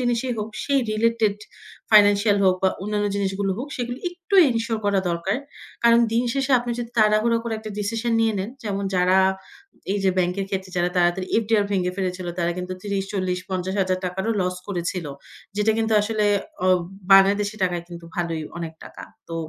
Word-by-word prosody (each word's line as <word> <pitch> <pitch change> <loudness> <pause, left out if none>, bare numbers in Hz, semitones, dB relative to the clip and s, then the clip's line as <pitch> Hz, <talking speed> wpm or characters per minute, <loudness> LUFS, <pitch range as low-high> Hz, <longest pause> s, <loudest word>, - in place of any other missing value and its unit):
জিনিসই 245 0 0
হোক 210 0 -3 0.2
সেই 280 -1 +2
রিলেটেড 220 -1 +1 0.5
ফাইন্যান্সিয়াল 205 -1 +5
হোক 185 -1 +5
বা 190 - +5
অন্যান্য 205 0 -1
জিনিসগুলো 195 0 -1
হোক, 270 +4 -5
সেগুলো 245 -1 -4
একটু 355 +2 -6 0.2
এনশিওর 230 -1 -1
করা 200 -1 +2
দরকার। 170 +6 -1 0.5
কারণ 235 0 +6
দিন 235 +2 +2
শেষে 275 0 -1
আপনি 240 0 -4
যদি 235 -1 -5
তাড়াহুড়ো 215 +2 +4
করে 230 -1 -2
একটা 215 0 -8
ডিসিশন 225 +3 -1
নিয়ে 225 -1 +2
নেন, 190 +4 -3
যেমন 200 -1 -2
যারা 185 +1 +4 0.7
এই 205 - 0
যে 190 - +4
ব্যাংকের 180 +2 0
ক্ষেত্রে 190 -1 -3
যারা 175 0 +1
তাড়াতাড়ি 175 +1 +2 0.2
FDR 215 -1 +2
ভেঙে 180 -2 0
ফেলেছিল 185 -2 -3
তারা 170 0 +1
কিন্তু 180 0 -4
৳৩০,০০০-৳৪০,০০০-৳৫০,০০০ 190 -1 -2
টাকারও 190 +5 -1
লস 180 0 -1
করেছিল। 175 -3 -3 0.5
যেটা 210 +1 +3
কিন্তু 225 0 0
আসলে 215 0 0 0.4
অব 185 -1 +5 0.3
বাংলাদেশী 200 +2 +5
টাকায় 175 -2 0
কিন্তু 170 -1 -10
ভালোই 165 -2 -2 0.2
অনেক 165 -1 -5
টাকা। - - -11 0.3
তো 165 - -5
200 Hz, 165 wpm, -23 LUFS, 185-225 Hz, 0.7 s, কারণ